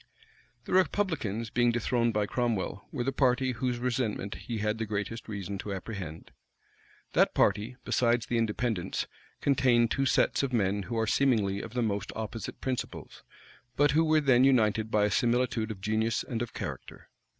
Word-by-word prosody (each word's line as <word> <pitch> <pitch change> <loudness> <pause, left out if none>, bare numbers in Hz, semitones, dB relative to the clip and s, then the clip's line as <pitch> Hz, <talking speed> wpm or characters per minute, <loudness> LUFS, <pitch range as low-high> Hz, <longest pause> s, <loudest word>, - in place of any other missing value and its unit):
The - - -4
republicans, 160 - +1
being 120 -1 +3
dethroned 120 0 +1
by 105 -1 +1
Cromwell, 110 -4 -2
were 130 -4 -2
the 135 - 0
party 130 -1 +2
whose 125 0 -2
resentment 120 -5 -2
he 115 - -5
had 105 +1 -1
the 115 - -2
greatest 105 +3 -4
reason 100 -2 -5
to 100 - -5
apprehend. 95 -5 -7 0.8
That - - +3
party, 105 +5 +2
besides 120 -1 +2
the 120 -2 0
Independents, 110 -3 -1 0.4
contained 125 -4 +3
two 135 -1 +1
sets - - +2
of 135 -2 -2
men 100 -3 +1
who 115 - -2
are 110 - +2
seemingly 105 -6 +2
of 115 +1 -9
the 120 - +1
most 100 -2 -2
opposite 110 0 -5
principles, 130 -2 -5 0.5
but 145 0 +4
who 160 +3 +4
were 155 -1 +3
then 130 -3 +4
united 110 -4 +3
by 105 -1 +3
a 105 - 0
similitude 120 0 +1
of 105 -3 -7
genius 110 +2 0
and 115 -2 -4
of 120 - -3
character. - - -7
115 Hz, 170 wpm, -29 LUFS, 105-125 Hz, 0.8 s, but